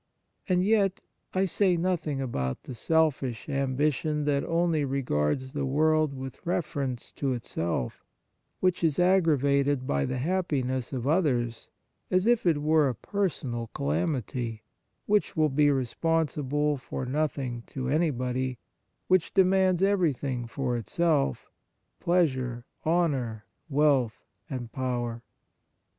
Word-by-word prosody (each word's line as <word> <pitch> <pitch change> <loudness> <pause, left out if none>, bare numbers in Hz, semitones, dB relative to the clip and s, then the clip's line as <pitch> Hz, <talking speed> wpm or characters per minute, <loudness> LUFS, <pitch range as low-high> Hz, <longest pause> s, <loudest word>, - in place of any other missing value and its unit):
And 180 0 +3
yet, 200 -2 +2 0.3
I 190 +1 +3
say 185 -1 +2
nothing 165 -5 -1
about 65 - -3
the 130 - -7
selfish 135 -4 0
ambition 145 +2 0
that 140 -1 +1
only 165 -2 +1
regards 130 - -1
the 145 -2 -1
world 155 +2 +3
with 130 -1 -8
reference 145 -7 -2
to 135 -2 -1
itself, 85 - -3 0.6
which 185 -1 +1
is 155 -4 +2
aggravated 145 -7 +3
by 70 - 0
the 130 - -2
happiness 130 -5 -1
of 130 -3 -3
others 130 -8 0 0.4
as 185 +1 +2
if 235 -5 +3
it 150 -3 +2
were 155 -2 +4
a 125 - -3
personal 130 - -2
calamity, 110 - -2 0.4
which 205 -4 +1
will 155 -1 +4
be 145 +2 +3
responsible 145 +1 0
for 130 0 -5
nothing 135 -3 -2
to 130 -2 -4
anybody, 130 -4 0 0.5
which 185 -2 +2
de 190 -1 +6
mands 185 -1 +3
everything 145 -11 +1
for 125 0 -2
itself 145 - 0 0.2
— - - -49
pleasure, 130 -9 +1 0.2
honour, 135 -10 0 0.2
wealth, 140 -6 +2 0.2
and 120 -4 -5
power. 120 -3 -2
140 Hz, 120 wpm, -28 LUFS, 125-165 Hz, 0.6 s, de